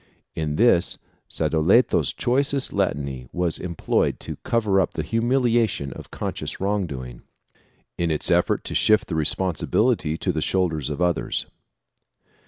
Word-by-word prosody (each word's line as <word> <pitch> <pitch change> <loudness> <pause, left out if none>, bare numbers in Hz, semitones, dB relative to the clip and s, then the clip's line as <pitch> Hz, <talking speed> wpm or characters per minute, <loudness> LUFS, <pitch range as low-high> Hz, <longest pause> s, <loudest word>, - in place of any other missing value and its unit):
In 75 -2 -2
this 105 -5 +3 0.3
Sadoleto's 90 +10 +2
choicest 135 +2 0
Latinity 65 -3 -2
was 90 -2 -1
employed 85 -2 -1
to - - -6
cover 105 -5 +1
up 90 - -2
the 80 - -2
humiliation 115 - +1
of - - -11
conscious - - -5
wrong 100 -1 0
doing, 65 -5 -8 0.8
in 85 -1 +1
its 75 -2 -1
effort - - +2
to - - -5
shift 110 0 +3
the 85 - -2
responsibility 90 - +1
to - - -1
the - - -2
shoulders 80 -7 0
of 75 +4 -2
others. 90 -2 0
90 Hz, 135 wpm, -23 LUFS, 75-115 Hz, 0.8 s, this